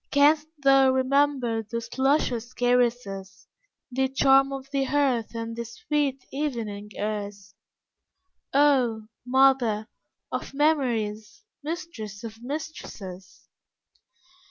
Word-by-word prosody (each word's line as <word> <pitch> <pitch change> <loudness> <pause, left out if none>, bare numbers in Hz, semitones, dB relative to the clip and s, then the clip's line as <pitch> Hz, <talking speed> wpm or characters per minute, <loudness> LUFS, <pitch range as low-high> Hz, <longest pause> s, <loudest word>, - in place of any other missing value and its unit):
Can'st 295 +2 +4 0.2
thou 270 -1 +6
remember 260 -3 +2
those 225 +1 -5
luscious 260 -3 +1
caresses, 240 -6 0 0.4
The 265 +1 +1
charm 270 0 +4
of 270 -1 -6
the 275 -1 +1
hearth 265 -5 0
and 230 0 -4
the 235 - -3
sweet 280 +1 -2
evening 230 -8 -3
airs? 205 -2 -4 1.0
Oh, 260 -6 +3 0.2
Mother, 250 -5 +3 0.4
of - - -5
Memories, 235 - 0 0.2
Mistress 290 - -6
of 225 0 -8
Mistresses! 240 - -8
250 Hz, 95 wpm, -26 LUFS, 220-275 Hz, 1.0 s, thou